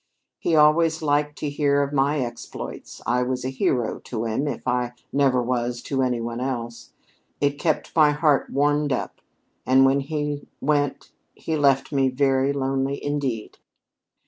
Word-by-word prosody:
He 165 - +1
always 160 +1 +4
liked 145 0 +1
to 150 - -3
hear 145 -1 +2
of 140 +1 -4
my 140 +1 +2
exploits. 120 -1 -7
I 125 +1 +1
was 125 0 -2
a - - 0
hero 125 -3 0
to 115 -2 -5
him, 115 +6 -1
if 145 - -5
I 125 0 0 0.2
never 135 -3 +3
was 120 0 -1
to 135 -2 -1
any 125 -2 0
one 115 +1 -4
else. 120 -3 -4 0.5
It 145 0 0
kept 155 -1 -1
my 155 -2 +6
heart 150 -1 +2
warmed 145 +1 +1
up, 130 - -3 0.4
and 130 +1 +5
when 135 +1 +3
he 145 0 -3
went 145 -1 0 0.2
he 160 - -3
left 140 -3 +2
me 135 -2 +2
very 135 +1 +2
lonely, 135 0 -1
indeed." 135 -7 -3
135 Hz, 160 wpm, -24 LUFS, 125-145 Hz, 0.5 s, my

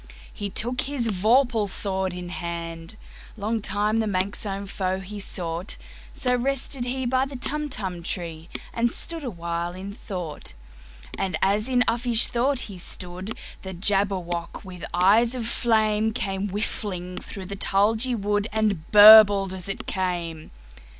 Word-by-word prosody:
He 205 - -4
took 240 +6 -1
his 265 -5 -1
vorpal 220 +2 +2
sword 190 -1 -1
in 180 0 -7
hand:Long 170 +6 -6
time 210 +2 0
the 220 -1 +1
manxome 200 +1 -2
foe 190 -1 -2
he 200 +2 -7
sought—So 180 +7 -4
rested 265 0 0
he 260 +1 -2
by 260 +2 +1
the 275 - -9
Tumtum 245 - -3
tree, 165 -2 -4 0.2
And 235 0 +1
stood 330 -2 -3
awhile 170 -6 -3
in 190 +2 -7
thought. 180 - -7 0.7
And 185 -4 -1
as 210 +5 +2
in 250 -1 +4
uffish 235 -1 +3
thought 255 +2 +1
he 195 -4 -7
stood, 180 +4 -4 0.2
The 190 -1 -7
Jabberwock, 185 -2 0
with 180 -2 -8
eyes 215 +7 +4
of 240 -3 -3
flame, 220 -2 +2
Came 195 -4 -2
whiffling 185 -3 -3
through 195 -3 -8
the 200 +2 -6
tulgey 220 +6 +2
wood, 205 0 0
And 210 -7 0
burbled 205 -2 +9
as 185 0 -7
it 195 - -4
came! 175 -4 -3
200 Hz, 135 wpm, -25 LUFS, 185-230 Hz, 0.7 s, burbled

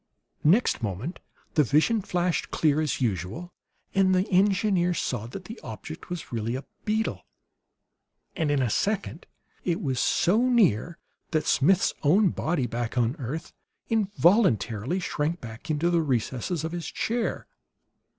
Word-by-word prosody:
Next 180 - +3
moment 110 - -4 0.3
the 150 - +4
vision 155 - +3
flashed 180 -2 -1
clear, 155 -1 +2
as 155 -3 -1
usual, 110 - -2 0.4
and 190 -1 +4
the 185 +2 +1
engineer 190 -2 +3
saw 120 -7 -2
that 185 +10 -8
the 225 +5 -8
object 115 +9 -9
was 175 -1 -6
really 115 0 -2
a 135 +1 -5 0.2
beetle; 220 +1 -1 1.1
and 160 -5 0
in 145 -2 +2
a 120 - +1
second 200 - -1 0.4
it 175 0 0
was 130 -9 -1
so 180 - +3
near 175 - +3 0.3
that 155 -2 0
Smith's 185 +7 +3
own 185 +7 +4
body, 160 -4 -1
back 120 +1 -3
on 120 -1 +3
the 150 - -10
earth, 145 +6 -5 0.4
involuntarily 185 - +2
shrank 165 -1 -2
back 115 +6 -10
into 155 +3 +1
the 170 -1 +3
recesses 135 - -1
of 160 - -3
his 175 -1 -4
chair. 235 0 -2
160 Hz, 145 wpm, -26 LUFS, 125-185 Hz, 1.1 s, the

